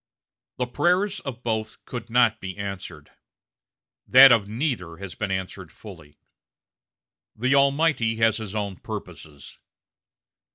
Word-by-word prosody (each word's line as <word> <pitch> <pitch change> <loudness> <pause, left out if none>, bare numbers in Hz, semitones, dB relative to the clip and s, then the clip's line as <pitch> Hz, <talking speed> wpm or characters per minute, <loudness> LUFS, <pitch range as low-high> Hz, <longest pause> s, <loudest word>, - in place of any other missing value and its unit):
The 125 - -1
prayers 180 +10 0
of 125 -3 -8
both 110 -2 -4
could 120 -2 -7
not 115 -2 +2
be 95 0 -7
answered 95 -6 -7 1.0
that 135 +1 +9
of 105 -4 +3
neither 110 - -3
has 100 -1 -8
been 105 - -4
answered 95 -2 -5
fully. 80 -7 -14 1.2
The 125 +4 0
Almighty 140 -4 +2
has 110 -1 +2
his 110 -2 -7
own 100 -3 -3
purposes. 75 -3 -10
110 Hz, 120 wpm, -24 LUFS, 95-125 Hz, 1.2 s, that